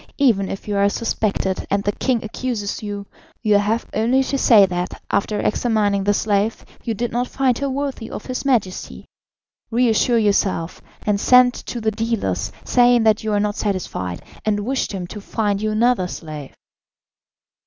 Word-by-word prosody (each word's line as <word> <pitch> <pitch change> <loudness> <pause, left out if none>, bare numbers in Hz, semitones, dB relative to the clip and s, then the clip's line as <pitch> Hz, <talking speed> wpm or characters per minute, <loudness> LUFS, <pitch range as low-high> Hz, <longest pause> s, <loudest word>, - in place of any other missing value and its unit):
Even 220 -9 +3
if 195 - -6
you 205 - -1
are 200 0 +4
suspected 200 -3 -1
and 200 0 +1
the 205 - +1
king 240 +2 -1
accuses 220 -2 -3
you, 205 -1 -5 0.4
you 210 -2 +4
have 215 +3 0
only 245 +5 +2
to 275 - -2
say 225 -6 +6
that, 180 -1 -4
after 210 +1 0
examining 210 -4 +1
the 205 - +3
slave, 210 +1 0 0.2
you 230 -2 -2
did 240 +2 -2
not 245 +2 -1
find 260 -3 0
her 280 0 -1
worthy 270 -4 -3
of - - -7
his 255 -1 -4
Majesty. 230 -9 -1 0.6
Reassure 235 0 +3
yourself, 200 -5 0 0.2
and 205 -1 +1
send 250 +2 +6
to 240 - -6
the 220 -1 0
dealers, 200 - -2
saying 245 -1 +4
that 220 -1 +3
you 220 - -1
are 205 - +2
not 205 0 0
satisfied, 180 - -3 0.2
and 205 -1 0
wish 260 +5 -1
them 190 -3 -5
to 205 +4 -8
find 205 -1 -1
you 215 - 0
another 215 -3 +2
slave." 155 -5 -8
215 Hz, 170 wpm, -21 LUFS, 200-240 Hz, 0.6 s, say